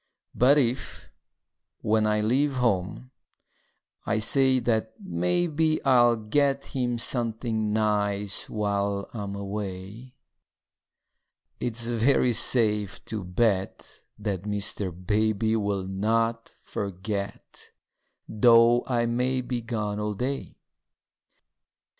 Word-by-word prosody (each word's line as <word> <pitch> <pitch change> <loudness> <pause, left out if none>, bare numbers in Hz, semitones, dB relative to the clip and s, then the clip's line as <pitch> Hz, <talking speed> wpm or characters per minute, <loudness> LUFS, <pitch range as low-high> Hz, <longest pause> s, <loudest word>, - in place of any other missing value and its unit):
But 135 +4 +4
if, 125 -3 -2 0.7
when 110 0 +1
I 105 0 +1
leave 135 +7 +1
home, 120 0 -1 0.9
I - - -1
say 130 +4 +4
that 110 -2 -1
maybe 155 - 0
I'll 120 -3 +5
get 135 +5 0
him 125 -2 -1
something 115 -2 -1
nice 105 -2 0
while 100 -1 -2
I'm 100 -3 -5
away, 100 +4 -7 1.4
It's 115 -1 -2
very 120 +1 +2
safe 105 -4 +3
to 105 -3 -5
bet 95 +1 -2 0.2
that 100 -4 -3
Mr. 105 -1 -1
Baby 110 +5 0
Will 100 -3 -1
not 115 +4 -1
forget, 100 +1 -6 0.6
though 115 +2 +5
I 120 -2 0
be 125 +1 -1
gone 105 -3 -3
all 105 0 -3
day. 135 +6 -4
110 Hz, 95 wpm, -26 LUFS, 100-120 Hz, 1.4 s, I'll